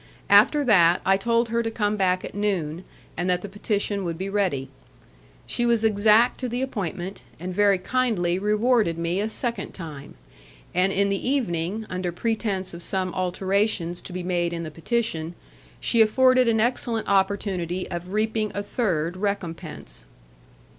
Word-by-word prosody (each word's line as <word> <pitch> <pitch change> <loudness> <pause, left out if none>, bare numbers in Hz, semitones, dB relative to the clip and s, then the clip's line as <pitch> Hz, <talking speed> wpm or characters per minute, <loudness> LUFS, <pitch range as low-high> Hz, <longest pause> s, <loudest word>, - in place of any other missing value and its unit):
After 295 -1 +6
that, 180 -8 +5
I 195 - +5
told 230 +3 +1
her 235 +1 +1
to 225 - -2
come 210 -2 0
back 185 -2 +1
at - - -8
noon, 185 -5 -2 0.3
and 175 +1 -1
that 180 0 +1
the - - -4
petition 205 0 -2
would 170 -2 -3
be 190 +2 -4
ready. 185 -10 0 0.8
She 240 - -1
was 235 -2 +2
exact 220 +2 +4
to 255 - -3
the 245 +2 -2
appointment, 195 -6 -4 0.2
and 180 +2 -5
very 200 0 +4
kindly 190 -4 0
rewarded 210 -3 +2
me 170 +2 -1
a 210 +2 -1
second 235 +1 -4
time; 150 -6 -9 0.6
and 185 +2 +3
in 200 +1 +2
the 200 +5 -1
evening, 215 -5 -1
under 185 -1 -3
pretence 200 -1 -2
of 170 - -8
some 185 0 -2
alterations 185 -1 0
to - - -8
be 180 0 -4
made 175 -1 0
in 170 0 -4
the 155 - -6
petition, 170 -2 -2 0.4
she 230 - +3
afforded 255 +3 +5
an 225 -1 +3
excellent 235 -1 0
opportunity 190 -2 0
of 175 +1 -5
reaping 215 0 0
a 205 - -2
third 180 - -1
recompense. 175 - -4
195 Hz, 160 wpm, -24 LUFS, 175-220 Hz, 0.8 s, After